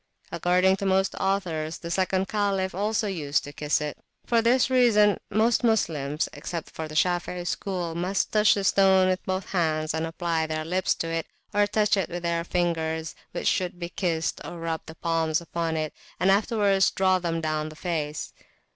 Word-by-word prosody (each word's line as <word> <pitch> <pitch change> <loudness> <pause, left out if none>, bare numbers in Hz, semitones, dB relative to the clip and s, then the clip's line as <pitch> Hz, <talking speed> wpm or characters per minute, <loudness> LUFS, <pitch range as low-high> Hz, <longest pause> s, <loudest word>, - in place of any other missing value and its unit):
According 185 +2 +3
to 195 - -4
most 190 0 +2
authors, 170 -5 -1
the 170 - -7
[p.165] - - -5
second 190 +1 +1
Caliph 195 -2 0
also 210 +4 0
used 150 -7 -1
to 145 - -9
kiss 150 0 0
it. 150 -1 -4 0.3
For 235 -1 +3
this 250 +3 +3
reason 215 -5 +4
most 225 +4 +2
Moslems, 155 - +1
except 165 +3 -6
the 155 -1 -6
Shafei 175 +1 0
school, 180 -3 -3
must 180 +4 -1
touch 215 0 +5
the 200 - -2
stone 190 -1 +4
with 185 0 -1
both 185 0 -3
hands 155 -4 0
and 160 0 -1
apply 165 -1 -1
their 155 0 -3
lips 185 +3 +1
to 165 - -3
it, 165 -1 -2 0.3
or 205 0 +3
touch 210 0 +2
it 190 - -1
with 175 0 -5
the 170 0 0
fingers, 160 -2 -1 0.2
which - - -3
should 180 -1 0
be 170 -1 -4
kissed, 165 -4 -1
or 175 - -7
rub 165 -1 -3
the 160 - -9
palms 165 -1 0
upon 165 -1 -3
it, 155 -1 -2 0.3
and 190 +1 +4
afterwards 200 -2 +3
draw 185 -1 +2
them 170 -2 -2
down 155 -1 -2
the 155 - -12
face. 155 -3 -3
175 Hz, 185 wpm, -26 LUFS, 160-195 Hz, 0.3 s, touch